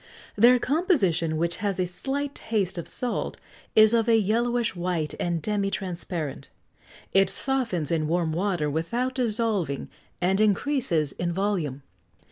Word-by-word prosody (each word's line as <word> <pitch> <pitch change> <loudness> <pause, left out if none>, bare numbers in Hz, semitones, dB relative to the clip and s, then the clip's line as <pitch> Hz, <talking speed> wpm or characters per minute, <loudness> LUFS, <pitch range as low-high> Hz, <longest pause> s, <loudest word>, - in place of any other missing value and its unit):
Their 240 +4 +6
composition, 235 - +1
which 170 +2 0
has 200 -1 -2
a 185 - +2
slight 275 +10 -3
taste 195 -5 -1
of 170 - -5
salt, 250 -1 -3 0.4
is 215 +1 +7
of 230 0 +2
a 225 - +6
yellowish 230 +2 +1
white 175 -3 -1
and 170 -1 -1
demi 200 +2 -1
transparent; 175 -6 -4 0.6
it 195 0 +4
softens 235 - -1
in 155 -2 +1
warm 165 0 0
water 175 -3 0
without 235 - -1
dissolving, 215 - -1 0.3
and 190 +3 +2
increases 205 - +2
in 175 0 -3
volume. 170 -8 -2
195 Hz, 135 wpm, -26 LUFS, 170-235 Hz, 0.6 s, is